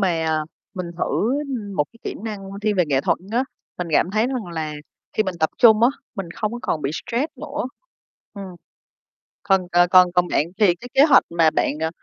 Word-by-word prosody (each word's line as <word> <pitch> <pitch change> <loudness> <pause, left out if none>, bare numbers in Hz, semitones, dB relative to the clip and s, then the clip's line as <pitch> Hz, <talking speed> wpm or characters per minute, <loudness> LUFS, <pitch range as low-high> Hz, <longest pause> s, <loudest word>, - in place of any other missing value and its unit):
mà 170 -4 +1 0.5
mình 185 -2 -4
thử, - - -3 0.5
ưm, 210 -7 -5
một 150 - +2
cái 230 - -20
kỹ - - -4
năng 215 -3 -4 0.2
thiên 210 -1 +1
về 180 - +4
nghệ 135 -3 +1
thuật - - +1
á, 245 +3 +2 0.3
mình 180 -1 -3
cảm 170 - +3
thấy 215 +3 +1
rằng 250 -6 -3
là 155 -2 -3 0.4
khi - - +2
mình 190 -3 -3
tập 160 - +2
trung 220 -2 +6
á, 240 - +7 0.3
mình 190 -4 -5
không 215 0 -2
có 240 - -4
còn 155 - -2
bị 135 - -1
stress 240 - -2
nữa. 300 0 -4 0.7
Ừm. 200 -1 -7 1.0
Còn 190 -3 +2
c 175 0 +3
còn 180 -1 +7
còn 180 0 +3
bạn 150 - +1
thì 195 -5 +5
cái 245 +7 -11
kế 275 - +6
hoạch 295 -4 +6
mà 170 -1 +3
bạn, 155 - 0
ờ, 160 0 0
195 Hz, 215 wpm, -22 LUFS, 170-230 Hz, 1.0 s, á